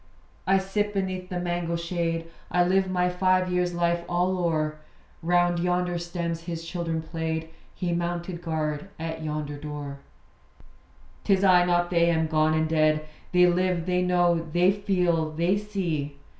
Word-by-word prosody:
I 195 +1 +5
sit 205 +2 -1
beneath 185 -1 -2
the 180 - -3
mango 175 -1 -2
shade; 170 -1 -2 0.2
I 180 - +3
live 190 +1 +2
my 180 -1 +1
five 185 0 +2
years' 180 -1 0
life 170 0 +1
all 180 +2 +1
o'er 155 -3 0 0.4
Round 175 0 +2
yonder 180 0 0
stems 170 -1 -4
his 165 -1 -5
children 165 -2 -2
played; 160 0 -3 0.3
He 175 -2 -2
mounted 175 0 -3
guard 155 -1 -2
at 160 0 -4
yonder 150 -1 -3
door. 145 -1 -6 1.2
'Tis 195 -2 +2
I, 180 -2 +6
not 175 0 +1
they, 170 -1 +4
am 160 -1 +2
gone 155 0 +2
and 160 0 +1
dead. 155 -1 +2 0.3
They 180 0 +6
live; 180 -1 +1
they 180 0 +1
know; 175 -2 +2
they 175 +3 +4
feel; 180 -5 +1
they 170 +5 +1
see. 175 -9 -3
175 Hz, 155 wpm, -26 LUFS, 160-180 Hz, 1.2 s, I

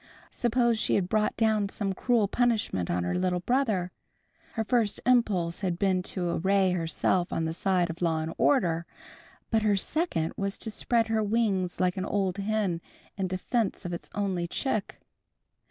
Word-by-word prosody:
Suppose 235 -1 +1
she - - +1
had 185 -3 +1
brought 215 +1 +1
down 220 -3 +2
some 195 -1 -2
cruel 230 0 +2
punishment 220 - 0
on 90 0 0
her 90 - -1
little 180 -1 0
brother! 215 -6 0 0.6
Her 225 - -1
first 225 -2 +1
impulse 205 -9 +2
had 180 -4 -1
been 190 -1 +2
to 180 -1 -2
array 195 -1 +3
herself 175 +1 0
on 165 - -1
the 160 - -2
side 180 0 +1
of 170 - -11
law 160 -2 +1
and 160 - -4
order, 170 - +2 0.6
but 220 -1 +3
her 210 -2 +2
second 195 - -1
was 195 0 -3
to 220 - -4
spread 230 +1 +1
her 220 -1 +2
wings 205 -4 0
like 180 0 +1
an 185 - -2
old 195 -2 -1
hen 200 -4 0 0.3
in 190 -1 -1
defense 195 +3 -1
of 175 - -3
its 170 - -7
only 190 -4 -1
chick. 215 +1 -2
195 Hz, 170 wpm, -28 LUFS, 180-220 Hz, 0.6 s, array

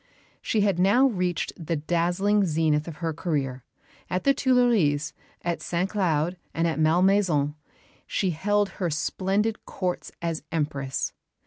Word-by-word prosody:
She 215 - +1
had 200 -4 +2
now 205 +9 +5
reached 180 - 0
the 165 +1 -1
dazzling 175 +6 +1
zenith 155 -3 +1
of 165 - -6
her 165 - 0
career. 140 -6 -2 0.5
At 185 - -1
the 275 - +5
Tuileries, 235 - +2 0.3
at 170 -1 -2
St 175 +2 -1
Cloud, 175 -3 0 0.2
and 165 +1 +2
at 160 -1 -1
Malmaison, 165 -2 +3 0.5
she 190 -3 0
held 205 +5 +1
her 175 - +1
splendid 195 +7 -1
Courts 180 -2 -3
as 165 -2 -2
Empress. 145 -4 -2
175 Hz, 135 wpm, -26 LUFS, 155-200 Hz, 0.5 s, now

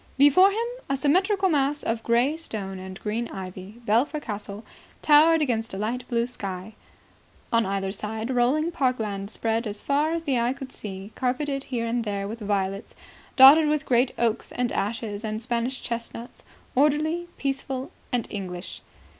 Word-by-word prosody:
Before 290 +8 +7
him, 445 +4 -1 0.2
a 275 - +1
symmetrical 375 +7 +2
mass 290 -3 +1
of 225 0 -1
grey 240 +6 +2
stone 200 - -5
and 190 0 -8
green 225 +3 -2
ivy, 190 +3 -8
Belpher 245 +8 +2
Castle 210 -4 -6 0.4
towered 310 +2 +6
against 225 -6 -1
a - - -4
light 240 +5 -3
blue 235 -1 +1
sky. 200 -4 -6 0.8
On 230 -3 +3
either 195 0 -1
side 220 +4 -4
rolling 265 +7 +2
park 255 -5 +1
land 200 -2 -4
spread 225 +1 -1
as 205 0 -4
far 290 +3 +1
as 335 0 -2
the 270 -6 +1
eye 240 +2 +1
could 270 -1 -9
see, 195 0 -7
carpeted 275 +2 -1
here 240 -3 -2
and 235 +1 -1
there 200 -2 -3
with 225 +3 -6
violets, 200 -1 -2 0.4
dotted 285 +4 +9
with 305 0 0
great 245 +1 +3
oaks 235 -1 0
and 245 -1 -1
ashes 210 0 -3
and 215 0 -3
Spanish 240 +2 -2
chestnuts, 235 0 -6 0.3
orderly, 305 +5 +2
peaceful 270 +1 -3 0.2
and 245 -3 0
English. 185 -3 -6
235 Hz, 165 wpm, -25 LUFS, 210-280 Hz, 0.8 s, dotted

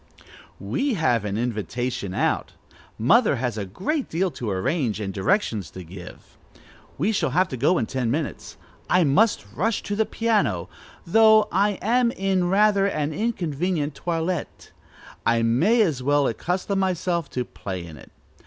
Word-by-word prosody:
"We 140 - -1
have 125 - +1
an 100 0 -2
invitation 120 -3 -3
out. - - 0 0.4
Mother 205 - +4
has 125 -3 -2
a 100 -3 -4
great 245 - -2
deal 180 +3 0
to 120 -7 -5
arrange, 110 - -1
and 100 -2 -4
directions 105 - 0
to 95 - -9
give. 90 +1 -12 0.6
We 190 +10 +1
shall 215 - 0
have 185 +1 +2
to - - -4
go 155 +9 +3
in 115 - 0
ten 125 -1 -2
minutes. 150 +5 -4 0.3
I 180 0 +4
must 180 - +3
rush 205 - -1
to 205 - -3
the 220 +1 +1
piano, 200 - 0 0.4
though 220 +3 +5
I 200 +1 +2
am 240 +3 +3
in 190 -2 0
rather 200 0 +4
an 155 -5 -2
inconvenient 170 -7 -1
toilette: 170 +1 -3 0.5
I 115 0 +2
may 175 - +3
as 155 -10 -1
well 145 +2 +2
accustom 180 - -1
myself 180 -4 -1
to 125 -1 -3
play 95 -6 -6
in 80 -2 -10
it. 65 - -14
160 Hz, 155 wpm, -24 LUFS, -, 0.6 s, though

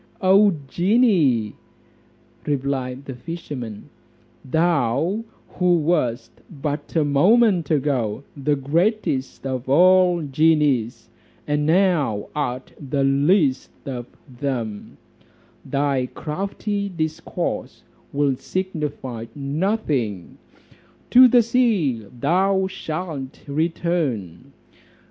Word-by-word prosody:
"O 195 0 +5
genie!" 170 - +2 0.9
replied 135 -2 -2
the 135 - -6
fisherman, 125 -6 -7 0.5
"thou 160 - +1 0.2
who 180 -1 +2
wast 125 -8 0 0.2
but 145 -1 -5
a 155 -2 +3
moment 180 +4 +3
ago 130 -6 0
the 145 +1 0
greatest 145 - -1
of 130 -1 -4
all 180 +2 +5
genies, 145 -5 +1 0.4
and 150 0 0
now 160 - +2
art 130 -3 -3
the 140 -1 -1
least 140 +1 +2 0.2
of 125 -3 -5 0.2
them, 120 -5 -5 0.7
thy 140 -2 0
crafty 200 +5 -3
discourse 160 -2 -4 0.3
will 140 -1 +1
signify 145 -9 -4
nothing, 140 - -2 0.7
to 255 +1 +9
the 245 -1 +5
sea 200 - +1
thou 190 +7 +2
shalt 155 -6 -5
return. 145 - -2
150 Hz, 85 wpm, -22 LUFS, 130-180 Hz, 0.9 s, to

